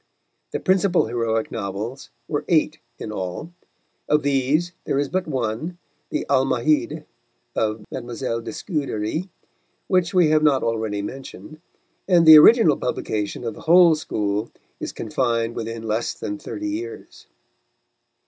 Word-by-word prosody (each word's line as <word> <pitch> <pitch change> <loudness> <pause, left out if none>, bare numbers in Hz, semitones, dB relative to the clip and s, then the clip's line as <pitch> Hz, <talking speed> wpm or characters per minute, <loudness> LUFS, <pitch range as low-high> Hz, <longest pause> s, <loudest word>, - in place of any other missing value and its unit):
The - - -3
principal 185 -1 +2
heroic 115 -1 -1
novels 110 +5 -5 0.2
were 145 - -2
eight 155 -2 +2 0.2
in 110 - -6
all; 95 - -5 0.6
of 150 0 +3
these 145 +5 +1
there - - 0
is 140 0 0
but 185 -1 -2
one, 130 +5 -3 0.3
the - - -2
Almahide 140 +3 +1 0.5
of 110 -1 -1
Mile, 120 -1 -4
de - - -7
Scudéry, 150 - -3 0.6
which 185 -2 +2
we 180 -5 +4
have 155 0 +4
not 145 -4 +3
already 110 -3 -2
mentioned, 135 +6 -9 0.5
and 175 -3 +5
the 155 -1 +11
original 170 - +6
publication 105 -2 -3
of 115 -2 -3
the - - -12
whole 175 -1 +7
school 105 -7 -2 0.3
is - - -4
confined 115 0 -1
within 115 0 -5
less 110 +1 -2
than 310 0 -5
thirty 315 0 -5
years. 370 +8 -7
135 Hz, 135 wpm, -22 LUFS, 115-165 Hz, 0.6 s, the